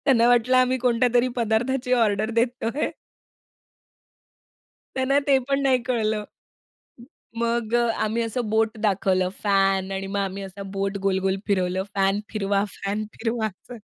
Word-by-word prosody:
त्यांना 235 -4 +5
वाटलं 245 +1 +4
आम्ही 255 0 +3
कोणत्यातरी 245 0 +2
पदार्थाची 245 +3 0
ऑर्डर 215 -3 +2
देतोय. 240 +3 0 2.0
त्यांना 270 +2 +2
ते 275 -1 +5
पण 275 0 +2
नाही 260 -2 +3
कळलं. 220 -4 0 1.2
मग 235 -1 -1
अ, 240 0 +3 0.2
आम्ही 220 +2 0
असं 230 0 -3
बोट 220 +1 +1
दाखवलं 190 -3 +1
फॅन 195 -1 +2
आणि 195 0 -3
मग 200 +1 -2
आम्ही 195 0 -3
असा 195 +1 -8
बोट 195 0 -2
गोल-गोल 190 0 +1
फिरवलं 185 -2 0
फॅन 195 +1 +2
फिरवा, 200 -1 +1
फॅन 200 +3 -3
फिरवा 225 -1 -2
असं. 220 +5 -12
220 Hz, 135 wpm, -24 LUFS, 195-245 Hz, 2.0 s, त्यांना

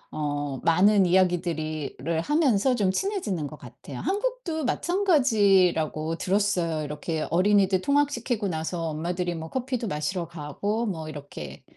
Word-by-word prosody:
어 145 -3 -2
많은 195 +4 +5
이야기들이 165 -5 0
를 160 +3 -1
하면서 265 - +2
좀 200 -5 +2
친해지는 210 - -2
것 150 +2 -10
같아요. 125 +2 -11
한국도 405 -7 -2
마찬가지라고 200 - +2
들었어요. 185 -5 0
이렇게 150 +2 -3
어린이들 190 +1 +3
통학시키고 280 -6 0
나서 165 -1 -3
엄마들이 175 +3 -2
뭐 160 -1 -6
커피도 255 -3 -2
마시러 165 +2 -2
가고 175 +8 -3
뭐 160 -6 -4
이렇게. 140 - -9
180 Hz, 330 characters per minute, -26 LUFS, 155-220 Hz, -, 많은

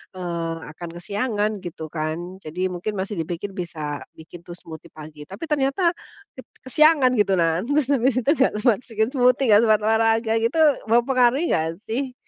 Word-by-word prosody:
eee, 170 -2 -3 0.2
akan 170 +2 -9
kesiangan 210 +3 -1
gitu 170 -2 -7
kan, 155 0 -2 0.3
jadi 155 +3 -8
mungkin 180 +5 -4
masih 195 +2 -3
dipikir 170 +4 -5
bisa 170 -2 -8 0.4
bikin 160 +2 -12
tuh 175 - -9
smoothie 165 -1 -12
pagi, 150 -1 -11
tapi 195 +8 -10
ternyata 275 +3 0 0.6
ket 260 - -10 0.2
kesiangan, 295 -1 +4
gitu. 205 -1 +2
Nah, 165 0 +1
terus 285 +1 +1
habis 260 0 +2
itu 255 - -2
nggak 265 - +2
sempat 235 -4 +3
se - - -22
bikin 220 +1 +1
smoothie 250 0 +3
nggak 210 0 +7
sempat 215 -1 +4
olahraga 225 +1 +2
gitu, 230 +7 0 0.3
mempengaruhi 245 +4 +3
nggak 160 - +1 0.2
sih? 255 +3 -2
215 Hz, 170 wpm, -22 LUFS, 170-255 Hz, 0.6 s, nggak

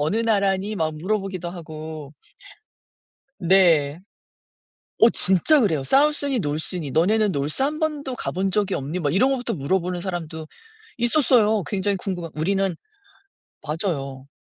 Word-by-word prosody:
"어느 155 +8 0
나라니?" 205 -2 +1
막 160 -3 -1
물어보기도 190 -1 -3
하고. 155 -3 -8 1.2
네. 165 -5 +4 1.0
어 230 - +7
진짜 195 - +3
그래요. 165 - +1
"South니 280 - +2
North니?", 155 - -3
"너네는 210 +7 +3
North 150 - -1
1 300 +3 0
번도 295 -4 -2
가 - - -3
본 190 +2 -1
적이 200 0 0
없니?" 150 +7 -3
뭐 145 -4 0
이런 250 +10 +3
거부터 250 -3 -1
물어보는 180 +4 -1
사람도 165 -4 -5 0.5
있었어요. 235 -4 +3
굉장히 195 +5 -1
궁금한 180 -3 -5
우리는 190 +2 0 0.9
맞아요. 140 -5 -4
185 Hz, 320 characters per minute, -23 LUFS, 155-215 Hz, 1.2 s, 어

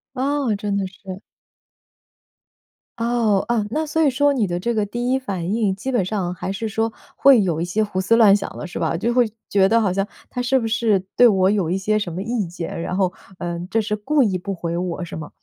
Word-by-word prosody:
哦， 270 -2 0
真 205 0 -2
的 195 - -1
是。 190 +1 -10 1.8
哦， 230 -4 +1
啊， 235 -3 +1
那 310 +7 -1
所 320 +2 0
以 295 - +5
说 285 +3 +2
你 235 -7 +1
的 175 0 -2
这 235 +5 -1
个 215 - +1
第 240 +5 -2
一 265 - +2
反 195 -6 -3
应， 210 -4 +1
基 260 +7 -4
本 240 -7 +2
上 185 -2 -2
还 180 +2 -4
是 220 +3 -3
说 225 +2 -1 0.2
会 275 -3 +6
有 165 -4 -1
一 170 - 0
些 210 +5 0
胡 190 -3 -2
思 225 +4 +3
乱 215 -4 +7
想 205 - -3
的 - - -5
是 175 - -6
吧？ 165 0 0
就 230 +7 0
会 240 -3 +2 0.2
觉 195 -1 +4
得 230 +2 +4
好 200 -5 +1
像 195 +1 0 0.3
他 250 - -2
是 245 +2 +2
不 230 -3 -1
是 220 -3 +2 0.2
对 245 - +7
我 190 -4 +3
有 195 -6 0
一 180 - 0
些 215 +2 +1
什 195 -4 -4
么 170 - -5
意 225 -4 -2
见， 170 -1 -6
然 180 - -3
后， 185 -2 +1 0.2
呃， 170 -1 -4
这 225 - +1
是 210 0 -2
故 275 +7 +2
意 200 -4 +1
不 200 +2 -5
回 170 -1 -3
我 175 0 -3
是 - - -8
吗？ 155 -1 -7
205 Hz, 255 characters per minute, -21 LUFS, 185-235 Hz, 1.8 s, 乱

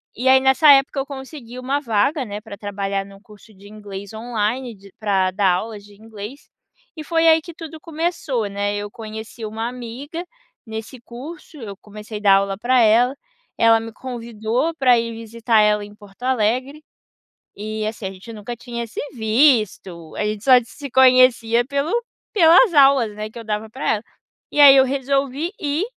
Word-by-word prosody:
E 255 +3 -2
aí 265 0 +7
nessa 265 +3 +5
época 275 0 +4
eu 270 - -2
consegui 265 -3 -9
uma 270 +3 -1
vaga, 250 +4 0
né, 205 0 -6
pra 205 -2 -10
trabalhar 200 -1 -3
num 195 0 -15
curso 215 0 -18
de 200 +1 -16
inglês 200 -2 -9
online, 235 +2 -3
de 195 0 -17
pra 195 -3 +1
dar 190 -1 +2
aulas 210 +1 -5
de 205 0 -17
inglês. 220 +4 -10 0.5
E 310 - -7
foi 330 +1 +1
aí 320 0 +6
que 340 +1 -11
tudo 320 -1 -10
começou, 320 -8 -2
né. 200 +1 -2
Eu 205 0 -5
conheci 220 +1 -8
uma 220 +2 -4
amiga 250 +8 -7 0.4
nesse 220 +3 -8
curso, 300 +7 -11
eu 210 -6 -8
comecei 210 0 -9
dar 195 -2 +6
aula 195 0 0
pra 250 +3 +2
ela, 235 +4 +4 0.4
ela 225 0 +5
me 225 - -8
convidou 235 +4 -3
pra 255 -5 +4
ir 230 0 -2
visitar 225 0 0
ela 210 0 +2
em 205 0 -11
Porto 205 +3 -16
Alegre. 255 +4 0 0.7
E 215 +1 -4
assim, 215 -2 -5
a - - -6
gente 195 +5 -12
nunca 220 +3 -7
tinha 235 -1 -6
se - - -8
visto, 215 - +1
a 210 - -2
gente 210 0 -3
só 265 - +5
se 280 +4 -10
conhecia 250 -2 +4
pelo 280 +3 -2 0.4
pelas 350 +2 +6
aulas, 270 -6 +5
né, 215 0 -5
que 230 - -13
eu 230 - -7
dava 215 0 -4
pra 260 +5 -4
ela. 210 - -7 0.5
E 295 - -1
aí 280 -2 +10
eu 265 - +7
resolvi 275 +5 -1
ir 300 +6 -1
230 Hz, 180 wpm, -21 LUFS, 210-270 Hz, 0.7 s, aí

